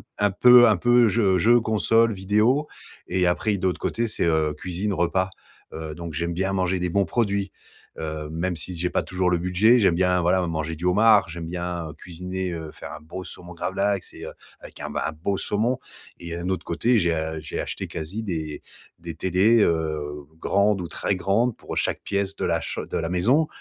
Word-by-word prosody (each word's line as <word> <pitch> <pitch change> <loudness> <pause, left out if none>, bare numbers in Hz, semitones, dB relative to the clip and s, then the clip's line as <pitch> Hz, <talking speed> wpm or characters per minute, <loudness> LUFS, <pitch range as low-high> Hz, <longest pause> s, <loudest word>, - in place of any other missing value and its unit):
p - - -20
un 105 -1 +3
peu 125 +3 +8
un 105 - +4
peu 120 +5 +4
jeu 100 -3 +2
jeu, 120 +6 +5
console, 115 +1 +2
vidéo 105 +9 +2 0.4
et 90 0 +1
après, 90 - -1
i 100 - -2
de 95 - -1
l'autre 90 - -2
côté 115 0 -1
c'est, 105 - -1
heu, 80 -2 +1
cuisine, 95 +6 -3
repas. 95 +1 0 0.4
Heu, 80 -1 -6
donc, 85 -1 -7
j'aime 85 +2 -2
bien 95 +2 -1
manger 95 -1 0
des 90 - 0
bons 100 +2 +2
produits, 100 -1 -1 0.5
heu, 75 -1 -4
même 85 +2 -2
si 90 +1 -5
j'ai 90 +1 -1
pas - - 0
toujours 90 -1 -1
le 90 - +2
budget, 90 +8 +4
j'aime 95 -4 +4
bien, 90 0 +2
voilà, 90 +2 +3
me 90 - -1
manger 80 0 -3
du 85 - -8
homard. 105 -1 +5
J'aime 85 0 -6
bien 85 -1 -4
cuisiner, 90 +2 -5
heu, 80 -2 -6
faire - - -9
un - - -8
beau 85 +4 -8
saumon 90 0 -9
gravlax 95 +3 -2
et - - -9
heu, - - -7 0.3
avec - - -13
un - - -5
b - - -8
un 80 - -2
beau 95 +6 -2
saumon 115 +5 0 0.4
et 85 -1 -6
heu, - - -5
un 90 - -3
autre 95 - -2
côté, 115 +8 +1
j'ai 85 -4 +2
a 80 0 -3
j'ai 75 - -5
acheté - - -4
quasi 85 +8 -5
des 80 -5 -4 0.4
des 85 -1 -7
télés, 95 +7 +3
heu, 75 -3 -1 0.2
grandes 100 0 +2
ou 85 - -6
très 100 - -1
grandes 105 +6 +1
pour - - -8
chaque - - -1
pièce 100 0 -1
de - - -3
la 85 -1 +1
cham - - -5
de - - -5
la 80 - -2
maison, 125 - +3
90 Hz, 220 wpm, -24 LUFS, 85-105 Hz, 0.5 s, peu